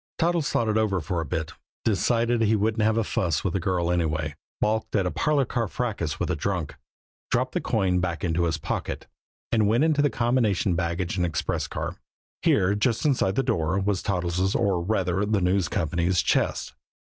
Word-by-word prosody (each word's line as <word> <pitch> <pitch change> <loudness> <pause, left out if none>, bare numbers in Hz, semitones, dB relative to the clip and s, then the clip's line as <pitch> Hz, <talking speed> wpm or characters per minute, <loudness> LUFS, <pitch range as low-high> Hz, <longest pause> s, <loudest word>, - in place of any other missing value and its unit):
Toddles 170 -2 +1
thought 115 - +1
it 110 0 +2
over 100 -4 +1
for 85 +2 -2
a - - -4
bit; 80 +2 -3 0.3
decided 115 +3 +2
he 110 0 +3
wouldn't 110 +2 +1
have 110 +1 +2
a 115 - +2
fuss 85 -6 -1
with 95 -2 -1
a - - +2
girl 90 -1 0
anyway, 80 -3 0 0.3
balked 110 +1 0
at 100 -3 +2
a 90 - 0
parlor 150 -3 +1
car 120 -2 -1
fracas 95 -9 -3
with - - -1
a - - +1
drunk, 90 0 -2 0.6
dropped - - +1
the - - -1
coin 90 -2 +1
back 85 -4 -2
into 85 0 +1
his 80 -2 0
pocket, 80 - -4 0.5
and 110 -3 +3
went 115 +7 +3
on 160 - +4
into 145 -1 +2
the 145 - +3
combination 115 -7 +1
baggage 85 +1 -1
and 90 - +2
express 75 -3 -2
car. - - -4 0.4
Here, 95 +2 +3
just 110 +6 0
inside 125 -9 +2
the 135 - +2
door, 80 -1 0
was 100 0 0
Toddles', 90 0 0
or, 95 -4 +1
rather, 95 0 0
the 105 0 +1
News 90 -1 +2
Company's 85 +2 +1
chest. - - 0
95 Hz, 195 wpm, -25 LUFS, 85-110 Hz, 0.6 s, on